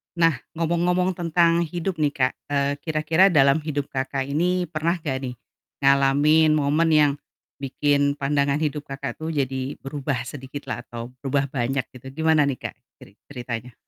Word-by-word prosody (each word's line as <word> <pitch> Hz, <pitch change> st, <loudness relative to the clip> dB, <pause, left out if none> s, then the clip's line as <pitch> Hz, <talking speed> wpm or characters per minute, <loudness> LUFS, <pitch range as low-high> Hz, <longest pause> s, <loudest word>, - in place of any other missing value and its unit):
Nah, 165 Hz, -6 st, +3 dB, 0.2 s
ngomong-ngomong 175 Hz, +2 st, +1 dB
tentang 170 Hz, 0 st, +2 dB
hidup 175 Hz, +1 st, -3 dB
nih 150 Hz, -1 st, +1 dB
Kak, 130 Hz, -1 st, +1 dB
eee, 140 Hz, -1 st, +1 dB
kira-kira 160 Hz, +4 st, +3 dB
dalam 140 Hz, -4 st, +4 dB
hidup 145 Hz, -2 st, -4 dB
Kakak 135 Hz, 0 st, -2 dB
ini 175 Hz, +7 st, 0 dB
pernah 165 Hz, +2 st, 0 dB
gak 150 Hz, -6 st, -3 dB
nih, 125 Hz, -, -6 dB, 0.5 s
ngalamin 140 Hz, +3 st, +4 dB
momen 150 Hz, +3 st, +2 dB
yang 150 Hz, -2 st, +5 dB, 0.5 s
bikin 140 Hz, +1 st, +1 dB
pandangan 140 Hz, +1 st, 0 dB
hidup 150 Hz, -1 st, -2 dB
Kakak 135 Hz, 0 st, -5 dB
tuh 160 Hz, +1 st, -3 dB
jadi 135 Hz, -1 st, -2 dB
berubah 135 Hz, -2 st, -3 dB
sedikit 135 Hz, +2 st, -8 dB
lah -, -, -3 dB
atau 120 Hz, +1 st, -8 dB
berubah 140 Hz, +1 st, -1 dB
banyak 130 Hz, +1 st, -1 dB
gitu, 130 Hz, +4 st, -8 dB
gimana 155 Hz, -2 st, +4 dB
nih 140 Hz, -, 0 dB
Kak, -, -, -14 dB, 0.3 s
ceri 95 Hz, -, -15 dB
ceritanya? 125 Hz, -2 st, -6 dB
145 Hz, 155 wpm, -23 LUFS, 135-160 Hz, 0.5 s, yang